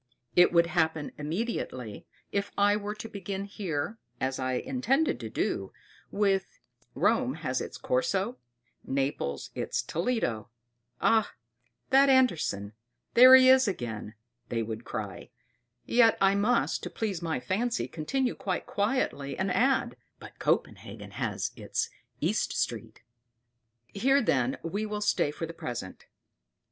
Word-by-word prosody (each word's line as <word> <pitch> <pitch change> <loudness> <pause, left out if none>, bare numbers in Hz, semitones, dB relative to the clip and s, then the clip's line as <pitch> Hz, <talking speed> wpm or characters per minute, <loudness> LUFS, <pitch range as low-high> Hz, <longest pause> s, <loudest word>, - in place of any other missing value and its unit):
It 180 - +6
would 170 -1 +5
happen 160 -3 0
immediately 150 - -4 0.2
if 200 0 -1
I 205 0 +4
were 210 0 -4
to 220 - -7
begin 195 -1 -5
here, 195 0 -4 0.2
as 130 0 -1
I 130 0 -1
intended 265 - 0
to - - -6
do, - - -2 0.4
with: 200 - 0 0.4
"Rome - - +2
has - - -2
its - - -6
Corso, 255 - -1 0.4
Naples 135 - -2
its - - -2
Toledo" 165 - -1 0.5
"Ah! 220 -2 +3 0.6
that 275 +1 +6
Andersen; 165 - +2 0.4
there 255 +2 +10
he 260 0 +7
is 260 -1 +6
again!" 115 - -4 0.3
they 115 -1 -1
would 110 +1 -6
cry; 105 -4 -6 0.6
yet 235 -2 +4
I 195 0 +4
must, 215 +5 +1
to - - -5
please 200 -6 -3
my 165 -5 -1
fancy, 230 - -1
continue 250 - -1
quite 185 -3 -3
quietly, 200 - -1
and 190 0 0
add: 250 - +2 0.2
"But - - -13
Copenhagen - - -2
has - - -2
its - - -2 0.3
East - - 0
Street." - - -3 0.8
Here, 265 - +2
then, 130 - +1
we 200 +6 -2
will 210 -1 -3
stay 205 -7 +2
for 150 +3 -4
the 165 - -8
present. 120 - -7
195 Hz, 135 wpm, -29 LUFS, 140-230 Hz, 0.8 s, there